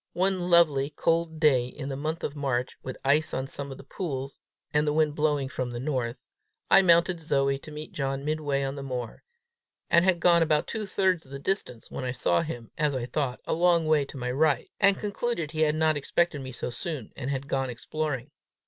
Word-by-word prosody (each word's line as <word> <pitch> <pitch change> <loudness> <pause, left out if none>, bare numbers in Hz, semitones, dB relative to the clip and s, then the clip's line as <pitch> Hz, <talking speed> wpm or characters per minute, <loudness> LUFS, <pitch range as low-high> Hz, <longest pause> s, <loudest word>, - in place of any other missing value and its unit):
One 185 -1 +1
lovely, 150 -5 +4
cold 165 +1 0
day, 135 -6 +4
in 135 +2 -7
the 135 - -3
month 155 +4 -3
of 145 - -3
March, 130 -3 -1
with 130 - -6
ice 150 +3 +3
on 130 - -2
some 140 +1 -4
of 135 - -7
the - - -11
pools, 135 -3 -5 0.3
and 150 +1 +2
the 150 - +2
wind 155 -1 +2
blowing 150 -2 +1
from 130 -2 -3
the 120 0 -5
north, 125 -4 -3 0.5
I 195 - +9
mounted 170 -1 +4
Zoe 140 -3 +1
to 155 - -11
meet 150 +1 -7
John 135 0 -3
midway 150 -2 0
on 135 0 -2
the 140 - -6
moor, 125 -4 -5 0.7
and 170 - +6
had 185 -2 +3
gone 170 0 +5
about 155 -2 +2
two 215 -2 -4
thirds 185 -5 +1
of - - -17
the 140 - -5
distance, 140 - -3
when - - -5
I 125 -1 -2
saw 105 -8 +2
him, 120 -8 -6
as 150 -3 +2
I 125 -2 -2
thought, 125 0 -2
a - - -1
long 170 -1 +3
way 155 -2 +3
to 135 - -10
my 125 -1 -2
right, 145 +2 +1
and 200 -1 +5
concluded 205 -6 -2
he 160 -1 -2
had 150 -1 +3
not 155 0 +3
expected 145 +1 0
me 130 -1 -6
so 125 - -5
soon, 135 -1 -5
and 135 -1 -4
had 140 0 -3
gone 135 -1 -1
exploring. 140 +2 -4
150 Hz, 220 wpm, -27 LUFS, 135-165 Hz, 0.7 s, I